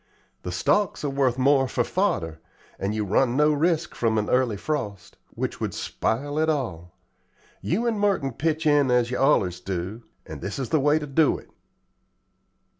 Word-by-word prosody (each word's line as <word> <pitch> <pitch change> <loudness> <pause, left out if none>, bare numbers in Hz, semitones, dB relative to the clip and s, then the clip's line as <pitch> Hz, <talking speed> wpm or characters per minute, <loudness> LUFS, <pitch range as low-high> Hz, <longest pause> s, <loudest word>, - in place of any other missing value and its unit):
The 90 - -5
stalks 185 - +1
are 145 - -1
worth 135 -3 +1
more 135 0 +3
for 125 - 0
fodder, 95 - -1 0.4
and 100 +2 -2
you 105 -1 -1
run 120 +6 +2
no 150 +1 +4
risk 160 +2 0
from 115 -2 0
an 105 0 -1
early 125 -5 +2
frost, 105 -7 -4 0.2
which - - -4
would - - -2
spile 145 +6 -2
it 160 0 +2
all. 90 - -3 0.7
You 215 +9 -1
and 225 -3 0
Merton 195 -10 +1
pitch 160 +1 -1
in 145 -3 +4
as 125 -1 +2
yer 125 - -2
allers 95 -11 +2
do, 95 +4 -4 0.2
and - - -9
this 100 - -4
is 130 -4 -3
the 155 - +2
way 145 +2 +3
ter 155 - -3
do 145 +1 +2
it." - - -16
135 Hz, 180 wpm, -25 LUFS, 105-155 Hz, 0.7 s, no